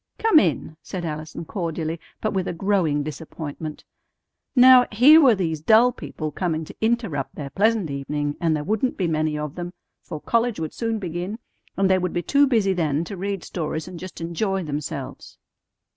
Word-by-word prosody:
"Come 440 Hz, -8 st, +5 dB
in," 155 Hz, -, -1 dB
said 180 Hz, -2 st, -5 dB
Allison 155 Hz, +1 st, -5 dB
cordially, 165 Hz, -3 st, -3 dB, 0.2 s
but 215 Hz, -, -1 dB
with 190 Hz, -2 st, -1 dB
a -, -, -2 dB
growing 170 Hz, -5 st, +1 dB
disappointment. 155 Hz, +1 st, -7 dB, 0.7 s
Now, 255 Hz, 0 st, +8 dB
here 280 Hz, +9 st, +7 dB
were 255 Hz, -6 st, +6 dB
these 160 Hz, -5 st, -2 dB
dull 225 Hz, +8 st, +5 dB
people 155 Hz, -10 st, -6 dB
coming 160 Hz, -1 st, -2 dB
to -, -, -12 dB
interrupt 220 Hz, -, -1 dB
their 140 Hz, -2 st, -6 dB
pleasant 210 Hz, -5 st, +1 dB
evening, 145 Hz, +1 st, -3 dB
and 165 Hz, -2 st, +2 dB
there 150 Hz, -, -3 dB
wouldn't 220 Hz, -, -1 dB
be 185 Hz, -, 0 dB
many 155 Hz, -1 st, 0 dB
of 150 Hz, -1 st, -4 dB
them, 175 Hz, 0 st, -6 dB, 0.3 s
for 155 Hz, -, -7 dB
college 230 Hz, +3 st, 0 dB
would 160 Hz, -1 st, -4 dB
soon 225 Hz, -1 st, -2 dB
begin, 180 Hz, +2 st, -4 dB, 0.4 s
and 195 Hz, 0 st, +3 dB
they 190 Hz, 0 st, +3 dB
would 180 Hz, -1 st, -2 dB
be 175 Hz, -, -1 dB
too 285 Hz, 0 st, +4 dB
busy 215 Hz, -7 st, +2 dB
then 160 Hz, -3 st, 0 dB
to 195 Hz, -, -7 dB
read 195 Hz, 0 st, -3 dB
stories 160 Hz, -1 st, -4 dB
and 180 Hz, -2 st, -8 dB
just 185 Hz, +1 st, -9 dB
enjoy 190 Hz, +3 st, -2 dB
themselves. 145 Hz, -3 st, -6 dB
175 Hz, 180 wpm, -23 LUFS, 155-210 Hz, 0.7 s, Now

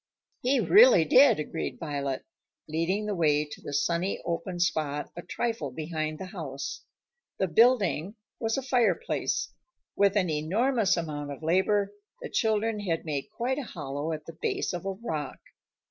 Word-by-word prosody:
"He 260 Hz, +2 st, +2 dB
really 485 Hz, -, +7 dB
did," 255 Hz, -, +6 dB
agreed 155 Hz, +2 st, -4 dB
Violet, 140 Hz, -4 st, -3 dB, 0.4 s
leading 165 Hz, +7 st, -1 dB
the 210 Hz, -, -1 dB
way 150 Hz, -4 st, +2 dB
to 150 Hz, -, -11 dB
the -, -, -7 dB
sunny 170 Hz, +6 st, 0 dB
open 175 Hz, +1 st, -3 dB
spot 155 Hz, -4 st, -1 dB
a 175 Hz, -, -6 dB
trifle 225 Hz, -4 st, -2 dB
behind 155 Hz, +2 st, -3 dB
the 190 Hz, -, -6 dB
house. 140 Hz, -7 st, -5 dB, 0.6 s
The 190 Hz, -, +1 dB
"building" 205 Hz, -2 st, +3 dB, 0.2 s
was 225 Hz, +1 st, 0 dB
a 270 Hz, -, -2 dB
fireplace. 240 Hz, -8 st, 0 dB, 0.4 s
With 200 Hz, 0 st, +3 dB
an 185 Hz, -3 st, +2 dB
enormous 200 Hz, -, +1 dB
amount 150 Hz, -3 st, -4 dB
of 140 Hz, -, -8 dB
labor, 195 Hz, +4 st, +2 dB, 0.3 s
the -, -, -7 dB
children 220 Hz, -1 st, +1 dB
had 170 Hz, -6 st, -2 dB
made 145 Hz, -3 st, -3 dB
quite 260 Hz, +4 st, -2 dB
a -, -, -3 dB
hollow 145 Hz, -, -4 dB
at 155 Hz, -1 st, -5 dB
the 165 Hz, -, -9 dB
base -, -, -1 dB
of 175 Hz, +2 st, -4 dB
a 195 Hz, -, -1 dB
rock. 175 Hz, -, -4 dB
175 Hz, 160 wpm, -28 LUFS, 155-220 Hz, 0.6 s, really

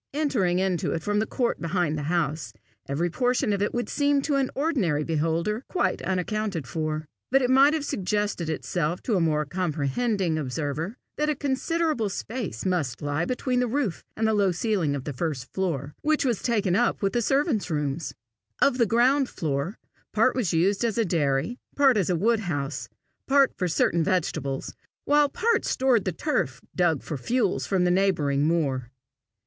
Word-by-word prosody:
Entering 230 Hz, -, +1 dB
it 185 Hz, -2 st, 0 dB, 0.2 s
from 205 Hz, +2 st, +1 dB
the 215 Hz, -, 0 dB
court 240 Hz, -, -1 dB
behind 170 Hz, -2 st, 0 dB
the 150 Hz, -, -3 dB
house, 155 Hz, -7 st, -1 dB, 0.4 s
every 165 Hz, +5 st, 0 dB
portion 250 Hz, -, +1 dB
of 200 Hz, -, -1 dB
it 205 Hz, -, +1 dB
would 240 Hz, 0 st, -2 dB
seem 285 Hz, -1 st, +2 dB
to 295 Hz, -, 0 dB
an 275 Hz, -2 st, +2 dB
ordinary 240 Hz, -, +1 dB
beholder 165 Hz, -, -1 dB
quite 370 Hz, -, 0 dB
accounted 190 Hz, -2 st, -2 dB
for; 155 Hz, +4 st, -3 dB, 0.2 s
but 270 Hz, +1 st, +4 dB
it 250 Hz, -, +2 dB
might 275 Hz, +4 st, +6 dB
have 300 Hz, -2 st, -2 dB
suggested 200 Hz, -, -1 dB
itself 165 Hz, +1 st, -2 dB
to 225 Hz, -, 0 dB
a -, -, +3 dB
more 150 Hz, -2 st, +1 dB
comprehending 170 Hz, -, -1 dB
observer, 150 Hz, -, -3 dB, 0.2 s
that 300 Hz, 0 st, +1 dB
a 300 Hz, -, +1 dB
considerable 285 Hz, -, 0 dB
space 200 Hz, -, -5 dB
must 155 Hz, -9 st, -1 dB
lie 145 Hz, +3 st, 0 dB
between 250 Hz, +1 st, -1 dB
the 250 Hz, -, +1 dB
roof 240 Hz, -6 st, -1 dB
and 220 Hz, -, +1 dB
the 220 Hz, -, +2 dB
low 200 Hz, -3 st, +3 dB
ceiling 175 Hz, -6 st, 0 dB
of 135 Hz, -, -4 dB
the 145 Hz, -, -4 dB
first 135 Hz, -2 st, -4 dB
floor, 150 Hz, -7 st, -2 dB
which 305 Hz, -1 st, +1 dB
was 240 Hz, -6 st, 0 dB
taken 210 Hz, -7 st, +1 dB
up 235 Hz, -1 st, +1 dB
with 195 Hz, -, +1 dB
the 240 Hz, -, +1 dB
servants' 270 Hz, -, +1 dB
rooms. 150 Hz, -1 st, -2 dB, 0.5 s
Of 260 Hz, -2 st, +3 dB
the 235 Hz, -, +4 dB
ground 255 Hz, +5 st, +3 dB
floor, 150 Hz, +5 st, -2 dB, 0.4 s
part 225 Hz, +4 st, +3 dB
was 235 Hz, -10 st, 0 dB
used 190 Hz, +6 st, +2 dB
as 230 Hz, -2 st, 0 dB
a 230 Hz, -, +2 dB
dairy, 155 Hz, -, 0 dB, 0.2 s
part 275 Hz, -3 st, +5 dB
as 195 Hz, -4 st, +1 dB
a 180 Hz, -, +2 dB
woodhouse, 170 Hz, -8 st, -1 dB, 0.4 s
part 275 Hz, -1 st, +4 dB
for 180 Hz, -, -1 dB
certain 170 Hz, 0 st, +2 dB
vegetables, 155 Hz, -7 st, -1 dB, 0.3 s
while 290 Hz, 0 st, +4 dB
part 460 Hz, +10 st, +1 dB
stored 255 Hz, -5 st, +2 dB
the 185 Hz, -, 0 dB
turf 130 Hz, -5 st, -1 dB, 0.2 s
dug 170 Hz, -5 st, +2 dB
for 150 Hz, -, -4 dB
fuel 215 Hz, -, 0 dB
from 190 Hz, -2 st, 0 dB
the 180 Hz, -, +3 dB
neighbouring 155 Hz, -7 st, +2 dB
moor. 135 Hz, -7 st, 0 dB
190 Hz, 175 wpm, -26 LUFS, 155-245 Hz, 0.5 s, might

